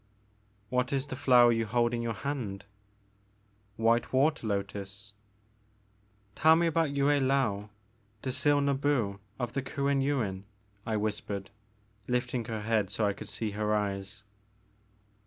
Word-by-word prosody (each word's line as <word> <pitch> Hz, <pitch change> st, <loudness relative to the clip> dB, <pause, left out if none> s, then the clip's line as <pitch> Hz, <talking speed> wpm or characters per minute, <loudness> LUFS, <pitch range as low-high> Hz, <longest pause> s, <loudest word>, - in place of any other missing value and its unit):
What 125 Hz, 0 st, 0 dB
is 135 Hz, -1 st, 0 dB
the 140 Hz, -, -5 dB
flower 125 Hz, -3 st, +6 dB
you 115 Hz, -1 st, 0 dB
hold 120 Hz, +2 st, +1 dB
in 120 Hz, -, -1 dB
your 115 Hz, -1 st, -2 dB
hand? 105 Hz, -7 st, -4 dB, 0.6 s
' 100 Hz, 0 st, -38 dB
White 115 Hz, +1 st, +3 dB
water 140 Hz, -1 st, +2 dB
lotus." 100 Hz, 0 st, -4 dB, 1.2 s
Tell 160 Hz, +6 st, +5 dB
me 170 Hz, +1 st, +2 dB
about 165 Hz, -1 st, +2 dB
Yue 140 Hz, 0 st, 0 dB
I^ou, 135 Hz, -8 st, +2 dB, 0.5 s
Dzil 140 Hz, +2 st, +2 dB, 0.2 s
Nbu 120 Hz, -9 st, 0 dB, 0.2 s
of 120 Hz, -2 st, -3 dB
the 140 Hz, -, -1 dB
Kuen 140 Hz, +1 st, 0 dB
Yuin, 110 Hz, -9 st, -1 dB, 0.4 s
I 110 Hz, -1 st, 0 dB
whispered, 105 Hz, -2 st, -3 dB, 0.6 s
lifting 125 Hz, -1 st, -1 dB
her 110 Hz, -2 st, -4 dB
head 110 Hz, -3 st, +1 dB
so 110 Hz, -, 0 dB
I 100 Hz, -, +1 dB
could 105 Hz, +1 st, -9 dB
see 110 Hz, -2 st, -3 dB
her 105 Hz, +1 st, 0 dB
eyes. 100 Hz, 0 st, -3 dB
115 Hz, 140 wpm, -30 LUFS, 105-135 Hz, 1.2 s, flower